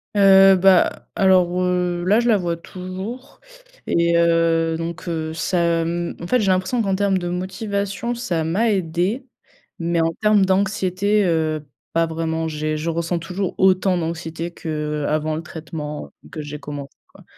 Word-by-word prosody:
Heu, 195 -1 +7
bah, 185 0 +3
alors, 185 -2 +3
heu, 180 -1 0
là, 205 +4 +4
je 240 - 0
la 225 -3 +5
vois 170 -3 -2
toujours 190 +9 -8 0.5
et 170 0 +2
heu, 165 -1 +2
donc, 165 +2 -6
heu, 160 -2 -3
ça 170 0 +1
m 170 +1 -2
en 170 - -5
fait, 250 - +2
j'ai 210 - 0
l'impression 185 +6 +1
qu'en 195 -3 0
termes 200 -1 +1
de 175 -1 -3
motivation, 200 +5 -3
ça 180 -9 -2
m'a 200 +8 +1
aidée, 190 +7 -1 0.5
mais 170 0 0
en 165 0 +1
termes 210 -2 +4
d'anxiété, 195 +1 +1
heu, 155 -3 0 0.3
pas 165 0 +3
vraiment. 160 0 -2
J'ai 155 0 -2
je 155 +2 -3
ressens 170 +1 -1
toujours 180 +3 -3
autant 185 0 +3
d'anxiété 165 0 -4
qu'avant 150 -1 -2
le 160 - -5
traitement 155 -2 -7 0.2
que 155 - -5
j'ai 150 0 -7
commencé, 145 -1 -8
quoi. - - -18
175 Hz, 160 wpm, -21 LUFS, 165-190 Hz, 0.5 s, Heu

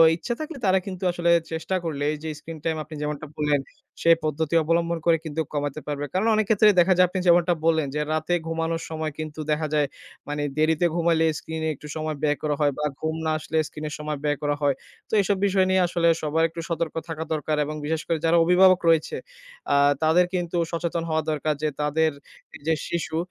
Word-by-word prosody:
ইচ্ছা 240 +8 -3
থাকলে 310 -1 -5
তারা 190 0 +4
কিন্তু 190 -2 -6
আসলে 170 0 0 0.2
চেষ্টা 160 +4 -2
করলে 150 -4 -3
এই 155 - -5
যে 160 - -3
স্ক্রিন 160 0 -9
টাইম 165 -1 0
আপনি 155 +1 -10
যেমনটা 150 0 -3
বললেন, 150 -2 +1 0.4
সেই 165 0 +6
পদ্ধতি 155 +1 -1
অবলম্বন 170 +1 +1
করে 165 -1 +5
কিন্তু 160 0 -2
কমাতে 145 0 -2
পারবে। 145 -1 -2
কারণ 190 +4 +1
অনেক 215 -1 +2
ক্ষেত্রে 215 -1 +6
দেখা 185 +2 +5
যায় 180 - +7
আপনি 185 - -2
যেমনটা 175 0 +5
বললেন, 160 -3 +3
যে 150 - 0
রাতে 155 +2 -1
ঘুমানোর 165 0 -1
সময় 160 -1 -3
কিন্তু 155 0 -6
দেখা 155 +1 0
যায় 150 -2 +2 0.4
মানে 145 0 -2
দেরিতে 160 +2 +2
ঘুমালে 165 -1 +2
স্ক্রিন 160 0 -6
এ - - +1
একটু 150 - -11
সময় 155 -1 -3
ব্যয় 150 -1 +2
করা 150 -1 +1
হয়। 145 -1 +4
বা 150 - -1 0.2
ঘুম 160 0 -1
না 160 - +1
আসলে 160 +1 -3
স্ক্রিন 155 0 -8
এর - - -7
সময় 150 -1 -3
ব্যয় 145 -1 +1
করা 145 0 +1
হয়। 140 -2 +2 0.3
তো - - -11
এসব 195 0 0
বিষয় 190 -1 +3
নিয়ে 190 0 +3
আসলে 170 -1 +1
সবার 155 +2 +1
একটু 165 +1 -6
সতর্ক 170 -1 -2
থাকা 160 0 -3
দরকার। 155 0 -1
এবং 155 - -5
বিশেষ 160 +1 -1
করে 165 - +1
যারা 165 +1 +4
অভিভাবক 185 +1 +6
রয়েছে 160 -2 +2 0.6
আ - - +4 0.3
তাদের 165 +3 +5
কিন্তু 175 -1 -1
সচেতন 170 0 -2
হওয়া 160 0 +1
দরকার 155 0 0
যে 155 - +2
তাদের 155 +2 +2 0.6
যে 160 - +4 0.2
শিশু, 165 -2 -2
160 Hz, 210 wpm, -24 LUFS, 150-170 Hz, 0.6 s, যায়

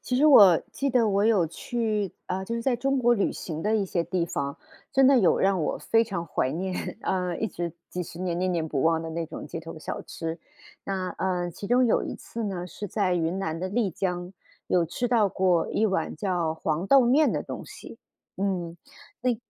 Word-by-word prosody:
其 250 - -2
实 300 +4 +5
我 200 - +8
记 275 - -2
得 235 -3 +3
我 200 +1 +2
有 210 -6 +4
去， 215 +3 -2
啊， 190 +1 -3
就 230 - -4
是 230 - -3
在 250 -2 +1
中 275 +2 0
国 240 -1 +4
旅 200 - 0
行 160 -2 -6
的 215 +2 +1
一 210 - +2
些 175 -2 -1
地 180 -2 -1
方， 140 -4 -3 0.4
真 270 -1 +5
的 275 - +6
有 190 -7 +4
让 195 -2 +2
我 150 - -1
非 225 0 +2
常 185 -6 -4
怀 135 -5 -1
念， 185 +2 -3
啊， 180 -2 -1
一 220 - -1
直 170 -3 -4 0.2
几 180 - -4
10 170 0 -9
年 175 -2 -1
念 185 0 0
念 165 -2 -1
不 140 -3 -1
忘 165 0 +2
的 165 - -5
那 165 0 -3
种 - - -8
街 - - -6
头 165 0 -9
小 - - -5
吃。 165 0 -5 0.5
那， 190 -2 -2
呃， 180 -2 -1
其 200 - -8
中 245 +4 +4
有 235 - +2
一 - - -5
次 230 -1 -6
呢， 185 -3 -3
是 205 +3 -7
在 190 -2 0
云 170 +3 -1
南 160 -3 -2
的 185 +2 -3
丽 205 -1 0
江， 180 +1 -3 0.4
有 175 -2 +2
吃 240 +8 -2
到 225 -4 +3
过 185 -3 +2
一 220 - +1
碗 195 -3 0
叫 175 -6 -1
黄 160 +3 -2
豆 275 +3 +7
面 265 +6 +4
的 - - -1
东 - - -7
西， - - -11 0.4
嗯， 180 -4 -2 0.4
那 250 0 +2
185 Hz, 235 characters per minute, -26 LUFS, 170-225 Hz, 0.5 s, 我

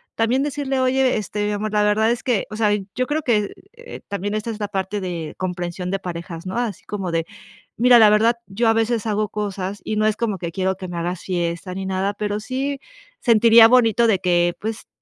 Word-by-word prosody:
también 240 +4 +1
decirle: 280 -2 -2
"Oye, 260 0 +2
este, 210 0 -2
amor, 210 +1 -3
la 210 0 +2
verdad 215 +2 +3
es 240 - -3
que, 240 -6 0
o 215 - -7
sea, 215 -2 +2 0.2
yo 255 0 0
creo 300 +1 -1
que", 215 -7 0 0.2
eh, 475 0 -11
también. 200 0 -3
Esta 215 +2 -3
es 215 - -7
la 205 - -2
parte 195 +1 -3
de 170 -4 -5
comprensión 180 0 -4
de 195 - -1
parejas, 170 -1 -7
no 185 +4 -4
así 235 -6 -3
como 195 -4 -4
de: 165 -1 0 0.5
"Mira, 245 +1 +6
la 215 -2 +7
verdad, 225 +3 +3
yo 220 +4 0
a 225 - +4
veces 225 0 0
hago 215 -1 0
cosas 200 -1 -4
y 215 - -3
no 215 0 +2
es 215 - +2
como 215 -4 -2
que 170 -1 -5
quiero 190 +1 -1
que 190 0 -7
me 175 - -6
hagas 175 +1 -3
fiesta 175 0 -3
ni 195 - -4
nada, 190 +1 -1
pero, 205 0 -2
sí 270 +5 -3 0.4
sentiría 230 -1 +7
bonito 235 -1 +4
de 205 -5 +2
que, 175 -1 +2
pues 220 +1 -5
210 Hz, 220 wpm, -21 LUFS, 185-230 Hz, 0.5 s, la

